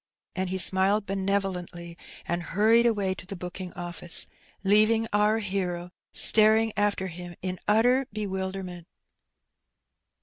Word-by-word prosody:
And 185 -1 -2
he 190 - -2
smiled 190 +3 +3
benevolently, 190 -3 -3 0.3
and 175 0 -1
hnrried 220 +7 +3
away 200 -5 0
to 185 - -12
the 195 - -6
booking 180 0 -7
office, 175 -1 -2 0.4
leaving 215 +3 +3
oar 210 +1 +3
hero 180 -4 -3 0.2
staring 220 0 +5
after 205 -2 0
him 175 -1 -8
in 185 -1 -4
utter 245 +5 +3
bewilderment. 190 -4 -5
190 Hz, 115 wpm, -26 LUFS, 180-210 Hz, 0.4 s, staring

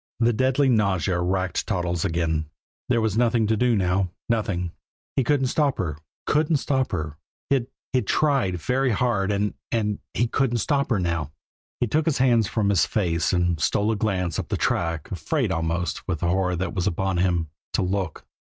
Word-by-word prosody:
The 120 0 +3
deadly 130 +4 +2
nausea 100 -6 +2
racked 95 +1 -1
Toddles 90 -2 -1
again; 80 -4 0 0.4
there 120 -2 +3
was 110 0 +1
nothing 115 -2 +3
to 110 +1 +2
do 120 +1 +2
now 95 -1 +1 0.2
nothing. 100 -6 0 0.4
He 135 - +3
couldn't 135 +1 +2
stop 140 +2 +1
her 80 -5 -2 0.3
couldn't 155 +1 +2
stop 130 -1 0
her. 80 -4 -3 0.3
He'd 130 -3 +2 0.3
he'd 125 -6 +1
tried 135 - +2
very 130 - +1
hard 105 -3 +1
and 105 +1 0 0.2
and 105 -3 0 0.2
he 120 - +2
couldn't 120 0 +1
stop 140 +5 0
her 115 -6 +2
now. 85 -5 -1 0.5
He - - +2
took 150 +7 0
his 160 - +2
hands 120 -5 +3
from 105 -1 0
his 100 -4 +3
face, 85 -6 0
and 90 -2 +1
stole 105 +7 +1
a - - 0
glance 95 -6 -1
up - - -3
the - - -1
track, 85 -3 -1
afraid - - -1
almost, 85 +2 -2
with 85 -5 -2
the 85 - +1
horror 90 0 +1
that 90 0 -3
was 90 0 -1
upon 95 0 0
him, 85 -3 +1 0.2
to - - +1
look. 90 -3 -2
100 Hz, 185 wpm, -24 LUFS, 90-120 Hz, 0.5 s, The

